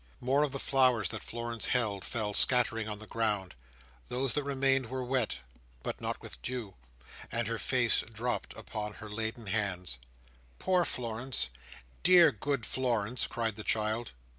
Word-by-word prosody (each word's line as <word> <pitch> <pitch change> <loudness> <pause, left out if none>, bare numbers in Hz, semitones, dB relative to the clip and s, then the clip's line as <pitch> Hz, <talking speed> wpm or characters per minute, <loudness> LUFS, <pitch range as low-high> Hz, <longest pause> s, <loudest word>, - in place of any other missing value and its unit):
More 135 +3 +2
of 150 -2 +1
the 140 - -3
flowers 125 - +3
that - - -4
Florence 115 -1 -2
held 110 -6 +2
fell 105 -3 -2
scattering 115 -2 +4
on 105 - -4
the 110 - -10
ground; 105 -4 -1 0.5
those 130 +1 -1
that 150 - +1
remained 135 -2 +2
were 130 +2 -3
wet, 125 - 0 0.4
but - - -4
not - - -2
with - - -9
dew; 120 -6 -4 0.6
and 115 -1 0
her 115 -1 -2
face 120 +1 +3
dropped 120 +2 -3
upon 105 -2 -5
her 110 - -9
laden 110 +2 -3
hands. 95 - -1 0.6
"Poor 180 -2 +2
Florence! 120 - -2 0.5
Dear, 175 -4 +7
good 130 +1 -2
Florence!" 120 -2 +1
cried 115 -3 -2
the 110 - -5
child. 110 - 0
115 Hz, 155 wpm, -31 LUFS, 110-130 Hz, 0.6 s, Dear